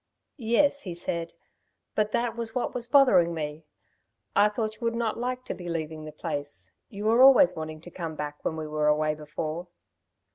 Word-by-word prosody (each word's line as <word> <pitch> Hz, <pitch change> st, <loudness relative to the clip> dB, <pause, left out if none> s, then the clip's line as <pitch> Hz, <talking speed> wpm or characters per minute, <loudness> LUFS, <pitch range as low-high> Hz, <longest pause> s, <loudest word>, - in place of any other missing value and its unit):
"Yes," 280 Hz, +5 st, +3 dB
he 180 Hz, -7 st, -6 dB
said, 170 Hz, -1 st, -3 dB, 0.6 s
"but 215 Hz, 0 st, +1 dB
that 235 Hz, 0 st, 0 dB
was 230 Hz, 0 st, -4 dB
what 250 Hz, -, -1 dB
was 240 Hz, -1 st, -2 dB
bothering 195 Hz, -, +5 dB
me. 155 Hz, 0 st, -5 dB, 0.7 s
I 205 Hz, +1 st, +5 dB
thought 215 Hz, 0 st, -2 dB
you -, -, -30 dB
would 230 Hz, 0 st, 0 dB
not 230 Hz, -1 st, -1 dB
like 250 Hz, +1 st, -3 dB
to -, -, -3 dB
be 175 Hz, -1 st, -7 dB
leaving 160 Hz, -2 st, -4 dB
the 155 Hz, -, -7 dB
place. 145 Hz, -1 st, -4 dB, 0.2 s
You 205 Hz, -2 st, -6 dB
were 230 Hz, +3 st, +4 dB
always 260 Hz, -9 st, +8 dB
wanting 155 Hz, 0 st, -6 dB
to 175 Hz, -, -12 dB
come 165 Hz, -3 st, -5 dB
back 150 Hz, -1 st, -6 dB
when 160 Hz, -, -2 dB
we 155 Hz, -, -4 dB
were 150 Hz, 0 st, 0 dB
away 155 Hz, 0 st, +2 dB
before." 155 Hz, +3 st, -5 dB
175 Hz, 190 wpm, -27 LUFS, 155-230 Hz, 0.7 s, always